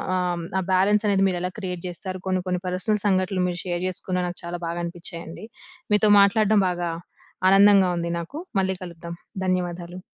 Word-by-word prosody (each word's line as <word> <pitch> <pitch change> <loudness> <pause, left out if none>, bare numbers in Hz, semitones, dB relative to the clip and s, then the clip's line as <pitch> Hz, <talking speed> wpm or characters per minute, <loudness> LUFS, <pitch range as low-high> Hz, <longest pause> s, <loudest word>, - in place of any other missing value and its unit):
ఆహ్ 175 -2 -1
ఆ - - 0
బ్యాలన్స్ 200 +3 +3
అనేది 195 -1 +3
మీరు 180 -1 -2
ఎలా 180 0 -2
క్రియేట్ 180 -3 -4
జేస్తారు, 185 +1 -6
కొన్ని 185 -1 +1
కొన్ని 180 -1 -1
పర్సనల్ 190 +4 0
సంఘటనలు 185 -1 +1
మీరు 175 -1 -3
షేర్ 175 -1 -2
చేసుకున్న 185 0 -2
నాకు 175 - -6
చాలా 175 0 -5
బాగా 170 +1 -3
అనిపిచ్చాయండి. 170 +1 -6 0.5
మీతో 210 0 +4
మాట్లాడటం 210 +1 +4
బాగా 175 -1 -2 0.6
ఆనందంగా 195 -1 +6
ఉంది 170 0 -2
నాకు. 170 - -7 0.2
మళ్ళీ 190 0 +1
కలుద్దాం. 170 -1 -8 0.3
ధన్యవాదాలు. 180 -1 -2
180 Hz, 165 wpm, -24 LUFS, 175-195 Hz, 0.6 s, ఆనందంగా